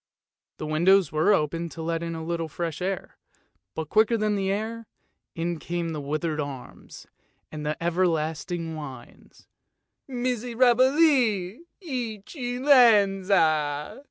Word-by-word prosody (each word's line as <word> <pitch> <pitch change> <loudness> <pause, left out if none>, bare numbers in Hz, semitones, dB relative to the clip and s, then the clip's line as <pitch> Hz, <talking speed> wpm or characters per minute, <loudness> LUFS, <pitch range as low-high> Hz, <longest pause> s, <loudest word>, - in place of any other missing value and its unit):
The - - -5
windows 175 +3 +3
were 155 +5 +2
opened 165 -2 0
to 165 - -7
let 165 0 -2
in 165 0 -4
a 160 - -6
little 165 -1 -2
fresh 165 +1 -5
air, 190 0 -4 0.6
but 160 -2 -4
quicker 220 +2 +3
than 215 -1 0
the 195 -1 -1
air, 220 +2 -4 0.5
in 170 0 -2
came 170 0 -3
the 155 -2 -4
withered 155 +2 -2
arms 140 -3 -8 0.5
and 150 -1 -6
the 150 0 -2
ever 175 +2 +1
lasting 165 +1 -3
whines, 145 -4 -11 0.3
" - - -39
Miserabili, 245 - +2 0.2
Eccellenza." 210 - +2
175 Hz, 125 wpm, -25 LUFS, 160-225 Hz, 0.6 s, windows